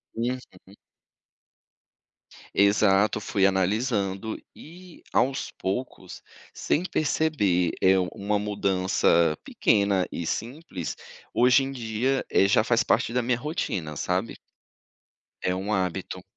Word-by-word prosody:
Uhum. 125 +3 -1 2.2
Exato, 100 +1 +3
fui 100 -1 +1
analisando 100 +1 0 0.2
e 175 +2 -14
aos 135 +2 +1
poucos, 110 +7 -5 0.3
sem 165 - 0
perceber, 140 - +1
eh, 95 0 +5 0.2
uma 105 +1 -1
mudança 95 -5 +1
pequena 100 -3 +1
e 85 - -4
simples 115 - -4 0.4
hoje 125 +2 +5
em 135 - -4
dia, 125 +1 -1
eh, 100 - +4
já 105 +2 +4
faz 115 0 +2
parte 115 - +1
da 125 - +2
minha 120 0 0
rotina, 100 - -3
sabe? 90 +8 -2 1.0
É 90 - 0
um 95 +3 -3
hábito. 95 -4 -2
105 Hz, 105 wpm, -26 LUFS, 95-125 Hz, 2.2 s, eh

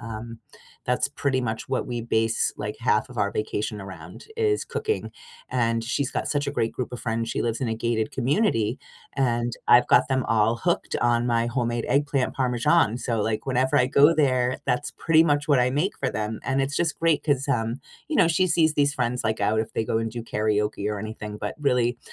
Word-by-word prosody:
um, 115 0 -7 0.5
that's 125 +2 +1
pretty 140 -2 -1
much 110 -2 -4
what 130 - -1
we 120 -2 -3
base, 115 -1 0
like, 105 0 -5
half 110 -1 +1
of 125 - -11
our 100 -1 +1
vacation 105 0 -3
around 90 -3 -10
is 430 -2 +1
cooking. 435 0 -3 0.4
And 115 -2 0
she's 135 +2 -1
got - - -3
such 145 -1 0
a 140 - -1
great 115 -5 -1
group 125 - -4
of 125 - -5
friends. 115 0 -2
She - - -2
lives 115 -1 -2
in 125 - -1
a 115 - -1
gated 110 -1 -1
community 130 - +1 0.4
and 120 -3 0 0.2
I've 120 0 +7
got 125 - +5
them 130 -2 0
all 115 +1 +2
hooked 170 +7 -1
on 120 0 +2
my 115 0 +1
homemade 120 -1 -1
eggplant 140 0 +1
parmesan, 120 -4 +2
so, 115 -3 -1
like, 110 +1 -1
whenever 130 0 +1
I 125 - +4
go 145 +4 +5
there, 130 -4 +1
that's 130 +2 -1
pretty 160 -1 +4
much 145 -2 +1
what 145 -3 +4
I 125 - +3
make 150 +9 -1
for 130 - -1
them. 110 +1 -3
And 135 0 0
it's 140 +1 -2
just 165 -3 0
great 165 -2 +2
'cause, 140 -2 0
um, 115 -1 -1 0.3
you 315 - -1
know, - - +5
she 185 +3 +2
sees 160 -2 +3
these 145 -1 +2
friends, 125 0 -1
like, 110 0 -1
out 105 +2 +2
if 110 - -5
they 110 - -1
go 110 - 0
and 115 0 -2
do 120 +1 -6
karaoke 105 -2 -1
or 105 - -3
anything, 105 0 -6
but 105 -1 -4
really, 125 -4 +1
120 Hz, 215 wpm, -25 LUFS, 110-140 Hz, 0.5 s, I've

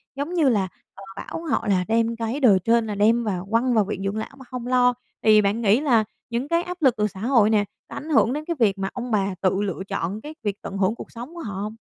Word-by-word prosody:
giống 285 +6 -4
như 310 -6 +3
là, 200 -5 +1 0.3
họ 195 - -11
bảo 330 - -6
họ 230 - 0
là 185 -2 +2
đem 230 +1 +1
cái 230 +4 -3
đời 210 -9 +5
trên 230 -1 +3
là 210 - -3
đem 225 +4 +3
vào 190 -3 -3
quăng 240 +2 +2
vào 215 -3 +3
viện 195 -1 -4
dưỡng 200 +2 -2
lão 220 - -4
mà 265 - -13
không 245 -1 -6
lo. 250 -1 +4 0.3
Thì 215 -1 +6
bạn 205 +3 0
nghĩ 215 +3 +4
là 240 -7 +3 0.3
những 240 +4 -2
cái 335 +1 +1
áp 360 -1 -7
lực 260 -5 +4
từ 210 0 +2
xã 190 -1 -11
hội 225 -2 +3
nè, 210 -2 +3 0.2
có - - -8
ảnh 310 - -7
hưởng 265 -4 +3
đến 305 +1 -4
cái 340 - -2
việc 205 -4 +3
mà 195 0 -2
ông 250 -1 -5
bà 195 -2 +1
tự 190 +1 +1
lựa 195 -2 -3
chọn 200 +2 -3
cái 305 +1 -8
việc 205 -1 -3
tận 195 - -6
hưởng 195 +3 +1
cuộc - - -10
sống 245 +8 -9
của - - -7
họ 200 -6 -5
hông? 215 +1 -5
225 Hz, 275 wpm, -23 LUFS, 200-250 Hz, 0.3 s, Thì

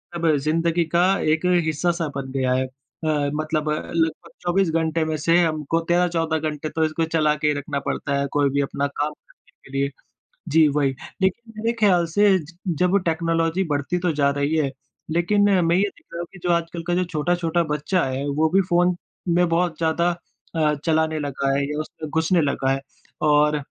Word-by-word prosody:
अब 170 -1 +1
ज़िंदगी 165 +3 +1
का 175 - +5 0.3
एक 160 +3 -2 0.2
हिस्सा-सा 165 +2 0
बन 135 -1 -5
गया 130 -1 +1
है। 130 +1 +1
अ, 145 +3 -3
मतलब 155 0 -1
अ, - - +1 0.2
लगभग 165 -1 -1
24 180 +1 +1
घंटे 160 0 0
में 155 - -1
से 165 +3 +3
हमको 155 0 0
13-14 165 -3 +1
घंटे 150 +1 -5
तो 160 - -1
इसको 155 +1 -1
चला 155 -2 +2
के 150 - +3
रखना 140 0 -3
पड़ता 140 -1 -1
है 140 - 0
कोई 145 -1 +2
भी 140 +1 +1
अपना 140 +1 -1
काम 145 +1 -3
करने - - -28
के - - -14
लिए। 140 0 +1 0.6
जी 155 0 +5
वही, 140 -2 +2 0.3
लेकिन 225 +5 -1
मेरे 225 +2 0
ख़याल 180 -5 +4
से 205 -2 +5
ज 170 +1 -12 0.2
जब 180 +2 +3
टेक्नोलॉज़ी 165 +2 +1
बढ़ती 145 +4 -1
तो 175 -2 +1
जा 140 -1 +4
रही 140 +2 0
है 150 -3 +1 0.4
लेकिन 175 +5 +2 0.2
मैं 170 +1 +3
ये 190 - +3
देख - - -25
रहा 170 - -5
हूँ 175 - -3
कि 195 - -12
जो 175 - -1
आजकल 170 0 -2
का 175 - +1
जो 180 - +2
छोटा-छोटा 170 +2 0
बच्चा 155 +4 0
है 130 +1 -3
वो 160 - +4
भी 195 - +5
फ़ोन 175 +1 +3 0.4
में 175 +1 +3
बहुत 170 -1 +1
ज़्यादा 170 +1 +1 0.5
अ, 155 -2 +2
चलाने 160 -1 +1
लगा 140 -1 -2
है 140 - +1
या 150 0 -3
उसमें 155 0 -8
घुसने 160 +3 +2
लगा 140 -2 0
है। 135 0 -1 0.4
और 150 0 +4
160 Hz, 195 wpm, -23 LUFS, 150-175 Hz, 0.6 s, का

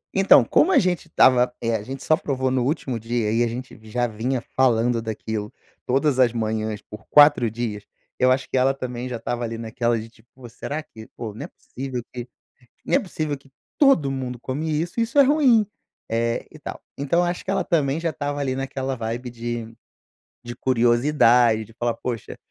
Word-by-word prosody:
Então, 195 0 +6
como 370 - +3
a - - +5
gente 180 -2 +1
estava, 125 -5 +4
eh, 115 -1 0
a 105 - -2
gente 135 +4 -7
só 155 - +4
provou 130 -4 -2
no 130 -1 +1
último 130 -3 -2
dia 115 -1 -1
e 120 +1 +3
a - - +1
gente 125 0 -7
já 120 +2 0
vinha 120 +3 -2
falando 120 -2 +3
daquilo 110 -1 -4 0.4
todas 135 +1 +2
as 125 -3 +5
manhãs 110 -2 -2
por 105 0 -12
4 145 -5 +6
dias, 110 -2 -4 0.4
eu 130 0 +4
acho 130 0 0
que - - -5
ela 130 +1 +3
também 125 -1 -5
já 120 - -4
estava 120 +1 -3
ali, 115 0 -4
naquela 115 +1 -1
de, 115 +1 -9
tipo, 115 +1 -25
"Pô, 130 -2 -11
será 145 +6 -5
que 110 -7 -13
pô, 110 -3 -5
não 105 - -7
é - - -8
possível 130 -2 -7
que 120 -1 -6 0.6
não - - 0
é 275 - +6
possível 155 - -3
que 140 0 -21 0.3
todo 225 - +4
mundo 130 -2 -4
come 150 +5 -3
isso 165 +8 -2
e - - +4
isso 230 +5 -1
é - - +10
ruim", 265 -6 +4 0.4
eh 115 +1 -1
e - - -13
tal. - - -7 0.2
Então, 145 +5 +1
eu 175 - +2
acho 175 0 -3
que - - -3
ela 195 - +1
também 150 -3 0
já 170 - -1
estava 145 -1 -3
ali 130 -2 -1
naquela 135 0 -3
vibe 115 +2 -4
de 120 -1 -5 0.7
de 120 0 -7
curiosidade, 120 -2 +3
de 115 - -18
falar: 120 0 -1
"Poxa, 120 -4 -5
125 Hz, 205 wpm, -23 LUFS, 115-145 Hz, 0.7 s, é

